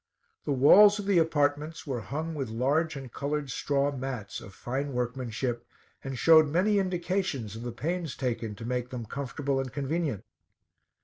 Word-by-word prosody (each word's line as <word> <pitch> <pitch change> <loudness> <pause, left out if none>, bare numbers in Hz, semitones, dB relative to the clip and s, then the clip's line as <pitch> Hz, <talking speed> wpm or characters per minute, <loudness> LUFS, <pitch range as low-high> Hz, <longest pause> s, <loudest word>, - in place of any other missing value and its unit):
The - - -1
walls 200 +10 +7
of 205 - -5
the 195 -3 +4
apartments 150 0 0
were 130 -5 -3
hung 155 +8 -4
with 135 -6 -3
large 140 +8 +1
and 135 -3 -8
colored 145 -1 -2
straw 140 +3 0
mats, 130 -7 -5
of 100 - -12
fine 135 +3 -3
workmanship, 125 -1 -2 0.4
and 135 -1 -5
showed 160 0 +7
many 190 +7 +2
indications 180 - -2
of 115 - -7
the 120 0 -4
pains 165 +4 -3
taken 115 -4 -3
to 115 +2 -8
make 125 0 -2
them 125 -3 -5
comfortable 140 +2 -2
and 130 -2 -3
convenient. 145 - -2
140 Hz, 165 wpm, -28 LUFS, 125-160 Hz, 0.4 s, walls